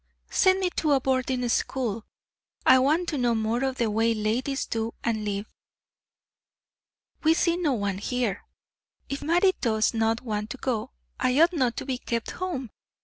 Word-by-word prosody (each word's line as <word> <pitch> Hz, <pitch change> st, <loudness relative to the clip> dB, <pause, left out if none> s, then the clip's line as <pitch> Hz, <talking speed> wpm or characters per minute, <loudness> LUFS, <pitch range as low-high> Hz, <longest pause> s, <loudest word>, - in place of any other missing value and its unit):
"Send 375 Hz, 0 st, +4 dB
me 365 Hz, -1 st, 0 dB
to 290 Hz, -4 st, +3 dB
boarding 260 Hz, -1 st, 0 dB
school. 230 Hz, -3 st, -1 dB, 0.6 s
I 260 Hz, -, +7 dB
want 310 Hz, +7 st, +2 dB
to 295 Hz, -, -2 dB
know 240 Hz, -2 st, +2 dB
more 225 Hz, +3 st, 0 dB
of 265 Hz, -1 st, -1 dB
the 230 Hz, -3 st, 0 dB
way 225 Hz, +2 st, +2 dB
ladies 240 Hz, +6 st, -1 dB
do 225 Hz, 0 st, -3 dB
and 220 Hz, -2 st, -1 dB
live. 205 Hz, 0 st, -2 dB, 1.8 s
We 320 Hz, +1 st, +4 dB
see 340 Hz, 0 st, +2 dB
no 335 Hz, -6 st, +1 dB
one 200 Hz, -4 st, -2 dB
here. 240 Hz, -2 st, -2 dB, 0.7 s
If 275 Hz, -, -4 dB
Mattie 350 Hz, +5 st, +3 dB
does 220 Hz, -2 st, +2 dB
not 225 Hz, 0 st, +1 dB
want 210 Hz, -3 st, -3 dB
to 265 Hz, -, -6 dB
go, 245 Hz, -2 st, -2 dB, 0.3 s
I 255 Hz, +2 st, +2 dB
ought 335 Hz, +3 st, +5 dB
not 255 Hz, -7 st, 0 dB
to -, -, -4 dB
be 260 Hz, -2 st, -2 dB
kept 230 Hz, -3 st, -3 dB
home. 325 Hz, -, -4 dB
250 Hz, 165 wpm, -26 LUFS, 225-280 Hz, 1.8 s, I